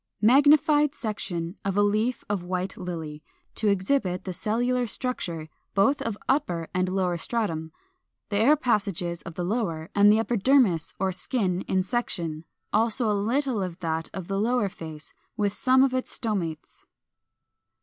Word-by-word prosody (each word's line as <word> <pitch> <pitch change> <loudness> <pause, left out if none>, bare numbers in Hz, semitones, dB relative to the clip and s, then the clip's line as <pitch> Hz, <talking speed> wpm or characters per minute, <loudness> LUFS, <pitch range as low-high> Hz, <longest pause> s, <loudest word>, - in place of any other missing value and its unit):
Magnified 290 +4 +5
section 195 -5 -4
of 195 0 -1
a 205 - +5
leaf 215 +4 +1
of 205 -3 -1
White 185 +1 -3
Lily, 160 -4 -6 0.3
to 215 - -1
exhibit 190 -1 +1
the 185 - -4
cellular 240 +6 0
structure, 175 - -4 0.3
both 220 +9 +3
of 225 -3 -2
upper 175 - 0
and 185 0 +1
lower 185 -2 0
stratum, 165 -8 -2 0.6
the 205 - 0
air 250 +9 +5
passages 200 - -1
of 165 - -9
the 175 - -3
lower, 180 -4 -2
and 205 0 +6
the 215 - +5
epidermis 225 - +2
or 190 0 +1
skin, 185 -2 -1
in 185 -1 +1
section, 170 -8 -2 0.3
also 225 +2 +2
a - - +2
little 235 +3 0
of 180 -3 -4
that 160 -1 -2
of 190 -3 -6
the 195 0 -1
lower 230 -1 +1
face, 160 -5 -9 0.2
with 205 -2 +1
some 260 +3 +4
of 270 -1 +2
its 255 0 -1
stomates. 185 -9 -4
200 Hz, 155 wpm, -26 LUFS, 175-240 Hz, 0.6 s, and